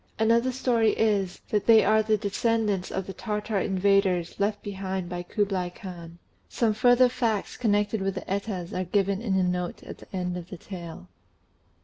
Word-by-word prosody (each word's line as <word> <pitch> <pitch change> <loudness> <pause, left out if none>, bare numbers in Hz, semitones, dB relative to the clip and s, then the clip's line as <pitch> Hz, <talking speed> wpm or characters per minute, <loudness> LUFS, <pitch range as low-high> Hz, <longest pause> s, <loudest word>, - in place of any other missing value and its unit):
Another 230 +3 +3
story 240 -3 +2
is, 200 -4 +1
that 210 -2 0
they 225 -1 +7
are 215 +2 +4
the 215 0 +1
descendants 210 -2 0
of 190 - -3
the 195 - -7
Tartar 210 0 -2
invaders 190 -2 +1
left 205 +1 0
behind 190 -2 -4
by 175 -1 -4
Kublai 190 -1 -1
Khan. 175 -2 -10 0.3
Some 225 -3 +1
further 245 +3 +5
facts 230 -4 -1
connected 210 -2 +1
with 195 0 -1
the 185 - -3
Etas 195 -3 -3
are 185 - -1
given 195 +2 0
in 205 -5 0
a 190 - +3
note 180 -1 -2
at - - -9
the - - -16
end 180 -1 -2
of 175 0 -8
the 185 - -7
tale. 170 - -9
200 Hz, 175 wpm, -26 LUFS, 185-220 Hz, 0.3 s, they